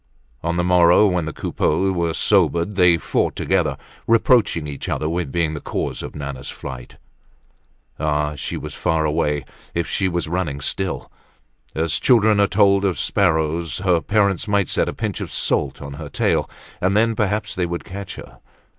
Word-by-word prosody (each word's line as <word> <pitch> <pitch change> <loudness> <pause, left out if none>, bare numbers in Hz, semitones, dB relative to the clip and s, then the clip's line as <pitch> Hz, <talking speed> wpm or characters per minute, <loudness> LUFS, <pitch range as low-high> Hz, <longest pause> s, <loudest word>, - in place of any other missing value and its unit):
On 85 +1 -1
the 90 - +1
morrow 90 +2 +5
when 90 -5 +1
the 80 - -3
Coupeaus 95 +5 0
were 85 -2 0
sobered 85 +4 +2
they 90 -3 +5
fought - - -1
together, 85 -8 0 0.3
reproaching 115 -7 +3
each 70 -2 -6
other 75 - -1
with 85 -3 -2
being 85 -3 0
the 75 - -6
cause - - -3
of - - -8
Nana's 70 -3 -6
flight. 65 -3 -8 1.0
Ah! 75 -1 0
she 75 - -4
was - - -7
far 80 -1 0
away 75 -2 0 0.3
if 85 -1 0
she 95 - 0
were 85 -1 -1
running 80 -4 -2
still! 95 +6 -2 0.6
As 80 -3 0
children 110 -4 +4
are 100 - +4
told 100 0 +3
of 95 -4 0
sparrows, 80 -4 +1
her 90 -3 +2
parents 100 -1 +1
might 100 -2 +1
set - - +1
a - - -4
pinch - - -3
of - - -5
salt - - 0
on 70 0 -7
her - - -8
tail, - - 0 0.3
and 95 +3 +2
then 115 +1 +3
perhaps 105 0 -1
they 90 -1 -1
would 85 0 -4
catch 100 +1 -7
her. - - -12
85 Hz, 175 wpm, -21 LUFS, 75-100 Hz, 1.0 s, morrow